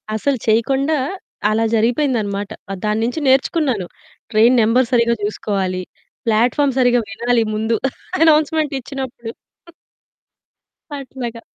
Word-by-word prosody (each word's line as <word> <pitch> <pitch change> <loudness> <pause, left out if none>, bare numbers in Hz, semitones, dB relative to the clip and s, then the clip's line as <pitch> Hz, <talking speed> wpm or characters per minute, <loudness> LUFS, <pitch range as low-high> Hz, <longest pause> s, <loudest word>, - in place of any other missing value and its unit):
అసలు 270 +4 0
చేయకుండా 270 +7 +2 0.5
అలా 225 +1 +1
జరిగిపేందన్నమాట. 225 -4 0 0.2
ఆ! - - -2
దానుంచి 225 +7 0
నేర్చుకున్నాను. 265 - +2 0.5
ట్రైన్ 230 +4 +5
నంబర్ 235 +3 +3
సరిగ్గా 235 -1 +3
జూసుకోవాలి. 195 -3 -2 0.4
ప్లాట్‌ఫార్మ్ 245 +5 +2
సరిగ్గా 245 -1 +4
వినాలి 235 +3 +1
ముందు 220 +2 0 0.5
అనౌన్స్మెంట్ 310 -1 +3
ఇచ్చినప్పుడు. 255 -3 -6 1.7
అట్లాగా. 245 -4 -7
235 Hz, 95 wpm, -19 LUFS, 220-270 Hz, 1.7 s, ట్రైన్